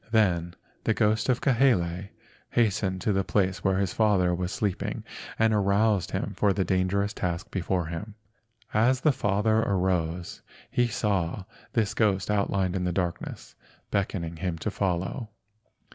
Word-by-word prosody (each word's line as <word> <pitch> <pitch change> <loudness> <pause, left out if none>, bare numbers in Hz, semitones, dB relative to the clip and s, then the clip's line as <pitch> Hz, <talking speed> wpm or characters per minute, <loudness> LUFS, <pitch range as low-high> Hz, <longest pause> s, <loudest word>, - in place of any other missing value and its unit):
Then 90 -6 +2 0.3
the 110 - +2
ghost 110 +2 +2
of 125 - +2
Kahele 100 -9 +2 0.4
hastened 100 -5 +1
to 105 - +1
the 95 0 +1
place 95 0 0
where 95 -1 +2
the - - +3
father 95 -2 +2
was 90 +1 -2
sleeping 105 -7 -2 0.3
and 110 0 +3
aroused 100 -1 +2
him - - -3
for 100 -2 +3
the 95 -1 0
dangerous 95 +3 +1
task 85 -3 -3
before 90 -1 -1
him. 85 +6 -6 0.6
As 125 +4 +3
the 155 - +4
father 110 -3 +1
arose 90 -4 -1 0.3
he 120 0 +2
saw 100 -5 -1 0.3
this 110 -4 +1
ghost 105 -3 +1
outlined 100 -2 +1
in 90 - -1
the 90 - 0
darkness, 85 -1 -3 0.4
beckoning 85 -4 -1
him 90 -1 -2
to 110 - 0
follow. 95 +4 -2
100 Hz, 145 wpm, -27 LUFS, 90-110 Hz, 0.6 s, the